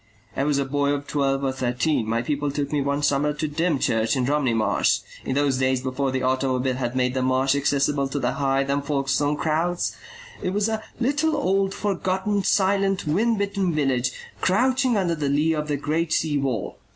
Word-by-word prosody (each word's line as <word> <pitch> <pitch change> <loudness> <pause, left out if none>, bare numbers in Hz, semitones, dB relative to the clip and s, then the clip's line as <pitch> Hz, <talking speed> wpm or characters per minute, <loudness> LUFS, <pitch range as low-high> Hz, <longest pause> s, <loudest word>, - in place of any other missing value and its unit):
I 135 - 0
was 145 -1 +1
a 140 - 0
boy 145 +1 0
of 145 0 -3
twelve 140 -1 0
or 135 - +1
thirteen. 125 0 0
My 115 +1 0
people 145 +2 -1
took 145 0 -3
me 150 -2 +1
one 140 +1 -1
summer 145 +1 +2
to 155 +1 -2
Dymchurch 145 -7 0
in 130 -2 0
Romney 135 -4 +1
Marsh; 110 -2 +2 0.2
in 130 - -2
those 140 -2 +1
days 130 0 +2
before 130 +1 -1
the 130 0 -2
automobile 130 0 +1
had 125 -1 -3
made 125 -1 +1
the 130 - -1
Marsh 130 +1 +2
accessible 140 0 +1
to 135 - -4
the 125 -2 0
Hythe 135 0 0
and 140 0 0
Folkestone 145 0 0
crowds, 165 +3 0 0.5
it 185 - -2
was 205 +1 +1
a 220 -1 -2 0.2
little 295 +5 +1
old 195 -4 +1
forgotten 200 0 -1
silent 195 0 +2
wind 215 +9 +1
bitten 200 -4 -1
village 130 -4 +1 0.3
crouching 250 +4 +2
under 180 -4 +1
the 150 -3 -2
lee 150 +3 +2
of 150 -1 -2
the 145 -1 -1
great 155 +3 -1
sea 155 -3 +1
wall. 130 -7 -3
145 Hz, 195 wpm, -24 LUFS, 135-175 Hz, 0.5 s, summer